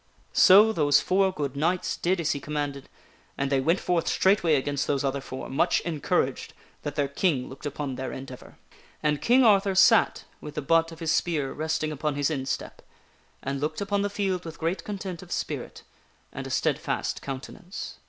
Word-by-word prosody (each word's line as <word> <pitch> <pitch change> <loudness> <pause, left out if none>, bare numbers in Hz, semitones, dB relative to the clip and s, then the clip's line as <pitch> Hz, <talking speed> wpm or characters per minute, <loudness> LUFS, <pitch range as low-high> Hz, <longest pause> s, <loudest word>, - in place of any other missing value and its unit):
So 210 +4 +7
those 145 -5 +4
four 190 +1 +2
good 145 -6 -4
knights 170 +5 0
did 180 +1 0
as 160 -2 0
he 145 - -2
commanded, 145 -1 -4 0.5
and 140 0 -1
they 135 - +3
went 165 +7 +2
forth 175 -2 0
straightway 190 -5 +3
against 140 0 -1
those 140 -1 0
other 135 0 -1
four, 130 0 -7
much 155 +6 +2
encouraged 160 -4 -1 0.3
that 145 - -5
their 145 -2 +1
King 140 -2 0
looked 135 +3 -7
upon 145 -1 -4
their 130 0 -4
endeavor. 130 -1 -9 0.5
And 150 -1 +1
King 255 +2 +5
Arthur 200 -3 +4
sat 215 +4 +5 0.2
with 150 - -8
the 150 - -2
butt 165 +3 +3
of 165 +1 -12
his 160 -1 0
spear 150 -6 0
resting 155 0 -2
upon 150 0 -2
his 145 +2 0
instep, 135 -3 -4 0.6
and 140 0 -3
looked 150 - -2
upon 200 0 0
the 205 - 0
field 195 -3 -1
with 165 -1 -8
great 165 +4 -2
con 205 -1 -5
tent 185 -3 -6
of - - -13
spirit, - - -4 0.5
and - - -6
a - - -7
steadfast - - -1
countenance. 175 +8 -7
155 Hz, 185 wpm, -26 LUFS, 140-185 Hz, 0.6 s, So